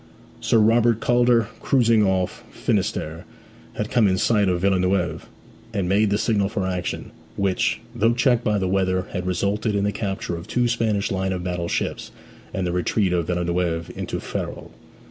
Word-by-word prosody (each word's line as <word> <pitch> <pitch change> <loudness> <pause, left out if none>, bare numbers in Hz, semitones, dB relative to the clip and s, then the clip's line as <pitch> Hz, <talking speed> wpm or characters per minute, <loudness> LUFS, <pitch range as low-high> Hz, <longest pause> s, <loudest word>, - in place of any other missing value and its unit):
Sir - - +2
Robert 115 +1 +4
Calder, 120 -2 +3
cruising 115 -5 +3
off 95 -2 0
Finisterre, 80 +2 -2 0.5
had 105 - -4
come 115 -4 +4
in 95 -1 +2
sight 105 -1 +2
of 90 -1 0
Villeneuve, 90 -3 +1 0.5
and 95 -3 0
made 100 +3 +3
the 100 - +2
signal 105 -3 +1
for 105 -3 -2
action, 90 -1 -3 0.2
which, 95 -2 0
though 115 0 +2
checked 120 -1 +2
by 105 -1 +1
the 95 -2 0
weather, 95 -1 +1
had 90 0 -3
resulted 100 +4 0
in 100 - +1
the 105 - +1
capture 95 -4 -3
of 85 +3 -8
two 120 +2 +1
Spanish 110 -4 0
line 95 0 -1
of 90 -1 -4
battle 90 -1 -2
ships, - - -2 0.4
and 95 - -2
the 90 - -1
retreat 90 +2 +1
of 85 -2 0
Villeneuve 85 -1 -1
into - - -4
Ferrol. - - -5
100 Hz, 170 wpm, -23 LUFS, 90-110 Hz, 0.5 s, Robert